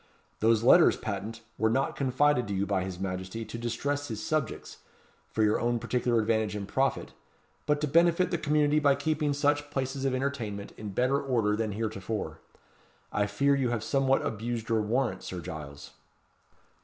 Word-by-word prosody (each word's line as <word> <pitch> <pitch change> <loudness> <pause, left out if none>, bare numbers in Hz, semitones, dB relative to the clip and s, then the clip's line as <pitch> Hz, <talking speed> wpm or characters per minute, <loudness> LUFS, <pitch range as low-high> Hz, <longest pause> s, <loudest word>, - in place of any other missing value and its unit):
Those 115 0 +3
letters 165 +7 +6
patent 110 +1 -5 0.2
were 110 - +3
not 135 +4 0
confided 135 -1 +2
to 100 - -2
you 95 +1 0
by 100 -2 0
his 95 -1 -6
Majesty 95 +4 -4
to 110 +2 -7
distress 140 +5 -2
his 110 -3 -5
subjects, 155 -7 -2 0.5
for 110 - 0
your 105 0 +3
own 120 0 +1
particular 120 0 0
advantage 110 -1 0
and 100 -1 -4
profit, 135 +6 -1 0.5
but 150 0 +2
to 150 - +1
benefit 170 +4 +3
the 170 - 0
community 150 -1 +2
by 140 -2 +4
keeping 150 +1 0
such 145 +1 +1
places 135 -1 -3
of 135 -1 +1
entertainment 120 -7 -3
in 105 - -7
better 130 +7 +1
order 115 -6 +1
than 110 -1 -2
heretofore. 110 0 -4 0.7
I 105 0 +1
fear 140 +6 +2
you 135 -3 +1
have 120 -3 -2
somewhat 135 -1 +2
abused 115 +1 -3
your 110 -1 +2
warrant, 110 -2 0
Sir 90 - -6
Giles." 75 -5 -8
120 Hz, 170 wpm, -29 LUFS, 105-140 Hz, 0.7 s, letters